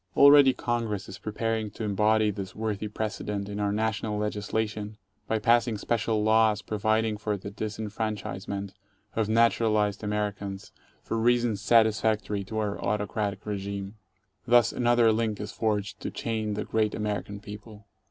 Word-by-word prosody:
Already 140 -1 +8
Congress 115 -5 -2
is 95 - -9
preparing 110 0 -2
to 110 - -7
embody 105 +1 +2
this 95 -2 -7
worthy 110 -1 -2
precedent 105 -1 -3
in 100 0 -5
our 100 -1 +1
national 110 0 -1
legislation 105 0 -2 0.3
by 110 - +1
passing 115 +1 +3
special 110 0 0
laws 110 -1 +3
providing 110 0 0
for 105 0 -2
the 100 +1 -8
disenfranchisement 105 -2 -4 0.4
of 110 -1 0
naturalized 110 -2 +2
Americans 105 -1 -3 0.3
for 115 - -2
reasons 120 -3 +2
satisfactory 110 -2 +2
to 110 +3 -5
our 105 -2 -2
autocratic 105 0 -2
regime. 100 -1 -4 0.5
Thus 120 -2 +5
another 120 -2 +4
link 110 -2 -1
is 105 0 -5
forged 105 -2 -1
to - - -4
chain 110 -2 -2
the 105 - -3
great 110 -1 0
American 105 -1 -3
people. 105 0 -11
105 Hz, 140 wpm, -27 LUFS, 105-110 Hz, 0.5 s, Already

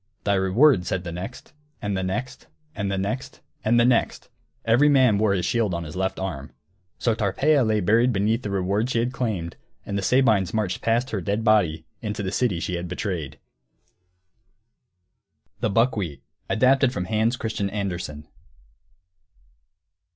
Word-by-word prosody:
"Thy 100 - +1
reward," 95 +3 +3
said 90 -2 -2
the 85 - -5
next 95 +9 -8 0.3
and 100 -1 -2
the 95 - -1
next 95 +3 -4 0.3
and 100 -2 -3
the 95 - -1
next 100 +7 -4 0.2
and 120 +2 +3
the 120 - +5
next; 125 -2 +1 0.4
every 120 +6 +4
man 130 -7 +4
wore 105 -2 +3
his 90 -3 -1
shield 110 -5 0
on 85 - -3
his 75 -1 -8
left 95 +1 -1
arm. 95 -8 -5 0.5
So 115 - +1
Tarpeia 130 +8 +2
lay 110 -2 +1
buried 115 +7 +3
beneath 110 +3 +1
the 105 - -5
reward 100 +4 0
she 125 - -1
had 120 +2 0
claimed, 105 -10 -3 0.3
and 100 - -4
the - - -2
Sabines 110 -4 +2
marched 100 -4 -1
past 120 +3 0
her 105 - -2
dead 100 +5 -1
body, 90 -8 +2 0.2
into 105 -2 -4
the 95 - -2
city 100 -6 0
she 90 +1 -3
had 85 +1 -5
betrayed. 85 -6 -4 2.2
THE - - 0
BUCKWHEAT 100 - 0
[Footnote 80 +4 -48
1: - - 0
Adapted 130 +1 +4
from 90 - -3
Hans 110 +4 +1
Christian 110 -4 -2
Andersen. 90 -7 -4
105 Hz, 165 wpm, -24 LUFS, 95-115 Hz, 2.2 s, the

